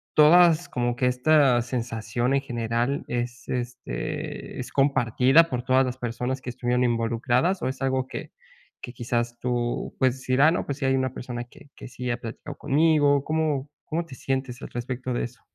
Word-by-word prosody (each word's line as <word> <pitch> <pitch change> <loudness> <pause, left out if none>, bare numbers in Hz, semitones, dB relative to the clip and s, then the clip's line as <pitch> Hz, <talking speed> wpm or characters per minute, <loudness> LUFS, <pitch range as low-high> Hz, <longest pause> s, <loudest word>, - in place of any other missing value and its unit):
todas 170 +2 +6
como 120 -1 -1
que 125 - +1
esta 125 -1 +4
sensación 120 0 -2
en 140 - +2
general 120 +1 -2
es, 120 0 -4
este, 120 - -4
es - - -5
compartida 135 +3 +4
por 125 -2 -2
todas 130 +1 +3
las 125 0 -4
personas 125 +2 -3
que 125 - -6
estuvieron 125 0 0
involucradas 120 +9 +1
o - - -1
es 130 0 -7
algo 130 -1 0
que - - -7 0.5
que 120 - -8
quizás 120 0 -2
tú, 120 -1 -2
pues, 130 0 +1
dirá, 135 +5 +4
no, 175 - -1
pues, 140 - -4
si 135 - -1
hay 135 - +3
una 130 -1 -1
persona 120 -1 -5
que 140 +4 -18
que - - -10
sí 125 0 -5
ha 120 - -1
platicado 120 +5 -8
conmigo? 145 -1 +3
¿Cómo 155 -3 -1 0.2
cómo 165 +2 -2
te 135 - -11
sientes 130 -1 -3
al - - -7
respecto 125 +1 -4
de 120 - -1
eso? 120 0 -11
125 Hz, 180 wpm, -25 LUFS, 120-140 Hz, 0.5 s, todas